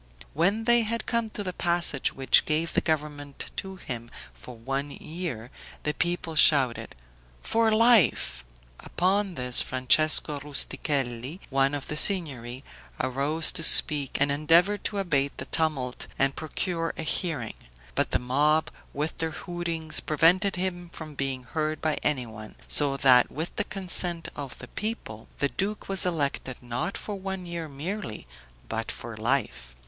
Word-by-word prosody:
When 195 +9 +1
they 240 +1 +4
had 230 0 -2
come 235 -2 -1
to 210 - -5
the 185 -2 -4
passage 170 -6 0
which 135 -1 +3
gave 160 +2 -1
the - - +2
government 150 -3 -3
to 190 0 -4
him 120 -9 -7 0.2
for 125 - -11
one 135 +5 -3
year, 150 -7 -6 0.3
the 150 - -1
people 175 0 -2
shouted, 135 - +3 0.5
"FOR 225 0 +2
LIFE." 215 - +4 0.4
Upon 190 +1 0
this, 125 -2 +3
Francesco 145 +3 +3
Rustichelli, 140 0 -1
one 135 +1 +2
of 140 - -6
the 150 - -4
Signory, 140 - +1 0.4
arose 145 +5 +1
to - - +1
speak, 150 -3 +7
and 145 0 +2
endeavored 170 +8 +3
to 205 - -2
abate 140 -8 0
the - - -5
tumult 140 -6 -1
and 135 0 +1
procure 165 +2 -3
a - - -3
hearing; 150 - -2 0.4
but - - 0
the - - +1
mob, 145 +5 +1 0.2
with 150 +3 -2
their 160 - 0 0.2
hootings, 170 -3 0
prevented 175 +6 +2
him 180 -1 -3
from 155 -2 -9
being 135 -2 -3
heard 155 +3 -3
by 155 -1 -1
anyone; 115 -7 -3
so 140 -2 +1
that 130 -2 +5
with 160 +4 -5
the - - +1
consent 180 -3 -2
of 140 -3 -7
the - - -10
people 205 - -5
the 140 - 0
duke 205 +7 -4
was 195 -2 +1
elected, 140 -6 -2
not 120 +10 -4
for 210 - -6
one 190 -1 -5
year 170 -2 -6
merely, 160 - -6 0.4
but - - -3
for - - -8
life. - - -2
155 Hz, 150 wpm, -26 LUFS, 135-180 Hz, 0.5 s, speak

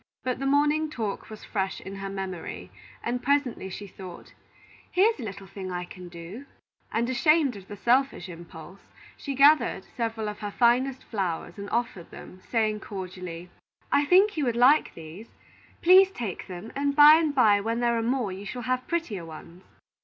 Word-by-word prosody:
But 255 -1 -2
the 275 - -1
morning 295 +2 +2
talk 220 -8 -4
was 215 -1 -10
fresh 190 -2 -2
in 195 +1 -8
her 195 0 -5
memory, 190 -3 -6 0.3
and 245 +1 -2
presently 265 -6 0
she 205 +2 -7
thought: 185 -2 -11 0.6
"Here 400 +5 +4
is 440 - -12
a - - -5
little 195 -2 -7
thing 190 0 -7
I 180 0 -3
can 180 0 -11
do;" 175 +10 -10 0.4
and 235 +1 0
ashamed 275 +1 +3
of 195 -1 -11
the 205 - -8
selfish 245 -3 +1
impulse, 170 +1 -11 0.4
she 275 - -5
gathered 290 +3 +4
several 225 -2 -2
of 210 0 -6
her 205 - -4
finest 250 +4 +2
flowers 190 -3 -4
and 200 0 -6
offered 235 -8 -2
them, 185 - -12
saying 215 -2 +1
cordially: 180 -4 -7 0.4
"I 290 - +3
think 380 +4 +4
you 295 - +1
would 240 -2 0
like 255 +6 +4
these. 165 +7 -10 0.6
Please 375 +2 +7
take 230 - -6
them, 185 +4 -8
and 280 0 0
by 300 +1 +9
and 310 -3 0
by 210 -6 +5
when 230 +3 -2
there 240 -1 +2
are 230 - 0
more, 240 -3 -1
you 190 +2 -7
shall 245 +5 -6
have 255 0 -1
prettier 320 - -2
ones." 165 +2 -11
225 Hz, 185 wpm, -26 LUFS, 190-275 Hz, 0.6 s, by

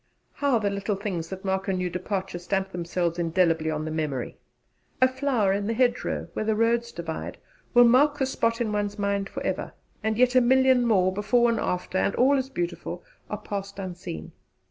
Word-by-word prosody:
How 280 -4 +2
the 205 -2 0
little 200 +1 -2
things 185 -5 -4
that 190 +1 -7
mark 190 0 -1
a 195 - +1
new 180 -1 -1
departure 185 +1 -3
stamp 190 +2 -2
themselves 175 -1 -2
indelibly 165 -2 +2
on 155 0 -2
the 155 - -4
memory! 150 -5 -3 0.6
A 255 - +6
flower 260 -7 +1
in 200 +1 -1
the 230 - -1
hedgerow 245 0 0
where - - -2
the 220 0 +1
roads 235 +1 +1
divide 165 -2 -5 0.4
will 245 - +9
mark 275 +5 +5
the 270 - +1
spot 230 -3 0
in 220 -3 -1
one's 205 0 -1
mind 200 -1 -1
for - - -6
ever; - - -2 0.3
and 220 0 0
yet 250 0 +4
a 255 - +6
million 260 0 +4
more, 185 -4 +3
before 235 +4 +3
and 230 - -1
after, 180 +1 -1
and 200 - +1
all 270 +3 +4
as 265 -1 -1
beautiful, 175 -5 -4 0.3
are 210 - -3
passed 200 -1 -6
unseen. 180 - -6
200 Hz, 195 wpm, -26 LUFS, 180-235 Hz, 0.6 s, will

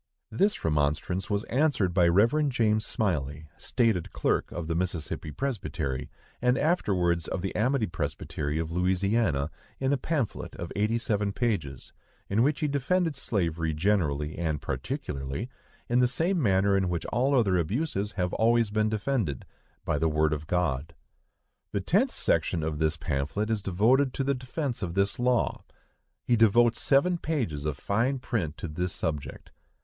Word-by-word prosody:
This 195 - +1
remonstrance 75 +5 0
was 100 +1 0
answered 125 - +1
by 90 -2 +4
Rev. 115 - +3
James 110 -4 +2
Smylie, 75 -7 -1
stated 115 -9 0
clerk - - 0
of 85 -1 -4
the 80 - -1
Mississippi 85 -3 -2
Presbytery, 80 - -3 0.3
and 125 +1 +3
afterwards 90 - +1
of 90 - -3
the 95 - -2
Amity 125 +2 +2
Presbytery 75 -3 -3
of 80 0 -2
Louisiana, 90 -3 +1 0.3
in 135 +1 +1
a - - +2
pamphlet 145 -9 -2
of 85 - -6
eighty 105 +3 +1
seven 105 -3 0
pages, 95 - -2 0.4
in 105 +3 +3
which 145 +5 +2
he 150 - +2
defended 155 +4 +1
slavery 85 - -1
generally 75 -5 0
and 80 -3 -1
particularly, 70 - -4 0.4
in 120 +1 +2
the 125 - +5
same 170 +7 0
manner 100 -3 +3
in 95 -2 +1
which 85 -2 -2
all 135 +3 +3
other 100 -6 +3
abuses 105 - -1
have 90 -2 -1
always 115 -1 +3
been 110 0 +2
defended—by 110 - -3
the 80 - +2
word 75 0 +2
of 75 0 -5
God. 80 -3 -1 0.8
The 100 - +1
tenth 205 - +2
section 80 0 0
of 80 -1 -2
this 80 0 +1
pamphlet 80 +9 -2
is 110 -2 0
devoted 120 +9 +2
to 135 - 0
the 140 +1 +1
defence 130 0 -4
of 90 -3 -3
this 100 +3 +1
law. 125 -1 +1 0.6
He 120 - +2
devotes 115 +1 +4
seven 170 +6 +3
pages 115 - -2
of 75 -2 -2
fine 115 - 0
print 100 - -2
to - - -5
this 90 +4 -4
object. 75 -3 -4
100 Hz, 155 wpm, -28 LUFS, 80-125 Hz, 0.8 s, the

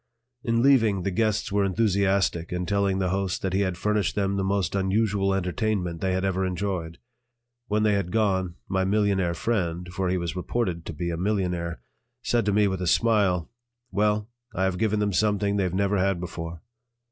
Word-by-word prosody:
In 115 -2 +1
leaving, 115 -9 +4
the 100 - -1
guests 110 +1 0
were 100 0 +2
enthusiastic 95 -3 +1
in 90 0 -2
telling 100 0 +1
the 95 -2 0
host 95 -1 -1
that 95 -1 -1
he 95 - +2
had 95 -3 0
furnished 105 -1 0
them 100 -1 0
the 95 - 0
most 95 -2 0
unusual 100 0 +1
entertainment 95 -2 -1
they 95 -1 0
had 95 +1 0
ever 95 0 0
enjoyed. 90 -3 -3 0.7
When 105 0 +1
they 105 -1 +3
had 100 -3 -1
gone, 95 -5 +1
my 95 0 0
millionaire 95 -3 +1
friend 90 -6 -1
for 95 -1 -1
he 90 - +1
was 85 0 -3
reported 90 -2 -2
to - - -4
be 85 +3 -3
a 85 - -3
millionaire 90 - -1 0.4
said 120 -3 +1
to - - +3
me 105 0 +3
with 95 -1 -2
a 90 - -1
smile: 95 -4 +2 0.4
"Well, 105 +1 +1 0.3
I 95 - 0
have 95 -1 0
given 105 -1 +1
them 105 -1 0
something 105 0 +1
they've 95 -3 0
never 100 +2 +1
had 95 -1 +1
before." 85 -2 -6
95 Hz, 190 wpm, -26 LUFS, 90-105 Hz, 0.7 s, leaving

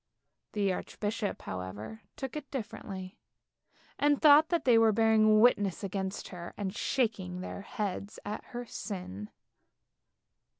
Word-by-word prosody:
The 200 -3 +1
archbishop 210 +3 -3
however 100 - -6
took 265 +1 -5
it 300 -2 -6
differently, 200 -6 -6 0.8
and 290 0 +3
thought 305 +1 +7
that 340 -1 0
they 245 -2 +6
were 225 -1 +6
bearing 215 0 +5
witness 205 -5 +3
against 190 0 -3
her, 175 -2 -8
and 200 -1 -3
shaking 200 -8 -1
their 190 - -6
heads 200 0 -4
at 210 +1 -4
her 245 0 -6
sin. 140 - -6
205 Hz, 125 wpm, -31 LUFS, 190-230 Hz, 0.8 s, thought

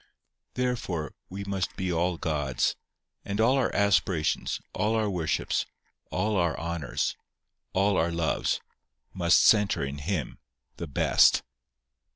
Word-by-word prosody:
Therefore, 120 - -2 0.2
we 100 +2 -6
must 100 -2 -3
be 95 -1 -2
all 85 +1 0
God's; 75 -6 0 0.5
and 100 +1 -4
all 115 +4 +4
our 130 - +1
aspirations, 90 -5 +1
all 105 +3 0
our 110 -1 +1
worships, 90 -6 -1 0.4
all 105 -1 0
our 85 -2 +1
honours, 85 -7 -2 0.6
all 100 +1 +2
our 85 +1 +1
loves, 85 -2 0 0.5
must 85 -1 +4
centre 105 -9 +4
in 70 +1 -5
Him, 80 -3 -3 0.4
the 85 - -5
Best. 70 - +4
90 Hz, 125 wpm, -27 LUFS, 80-100 Hz, 0.6 s, all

